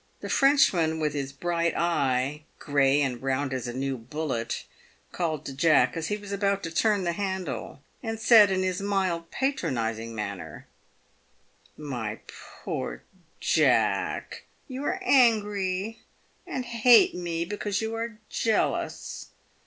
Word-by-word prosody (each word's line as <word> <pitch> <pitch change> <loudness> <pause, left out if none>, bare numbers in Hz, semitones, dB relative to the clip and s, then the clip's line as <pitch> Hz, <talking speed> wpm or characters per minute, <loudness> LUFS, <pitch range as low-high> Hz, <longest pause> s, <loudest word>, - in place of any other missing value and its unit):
The - - -6
Frenchman 185 - +3
with 150 -2 0
his 140 -2 -3
bright 170 +3 -1
eye, 145 -3 0
grey 140 0 +2
and 125 -3 -2
round 135 +1 -1
as 125 -2 -3
a - - -3
new 130 +1 -3
bullet, 130 -1 -3 0.5
called 155 -4 -2
to 135 - -5
Jack 135 -3 +3
as 165 -1 -3
he 210 - -1
was 205 -1 -10
about 200 0 0
to 165 - -4
turn 205 +2 +2
the 170 - 0
handle, 180 - -4 0.2
and 225 -2 -4
said, 220 -2 +7
in 190 -1 0
his 185 0 -1
mild, 190 -4 -1
patronising 115 - -2
manner: 100 -3 -6 1.1
■ - - -9
My 115 -6 -4 0.5
poor - - -4 0.4
Jack, - - +1 0.2
you 260 +1 -6
are 370 - 0
angry, 210 - +2 0.5
and 260 -8 -3
hate 235 0 +5
me, 170 -1 -3
because 205 +1 -2
you 220 0 -3
are 225 -1 -4
jealous. 225 -1 -1
170 Hz, 135 wpm, -27 LUFS, 135-205 Hz, 1.1 s, said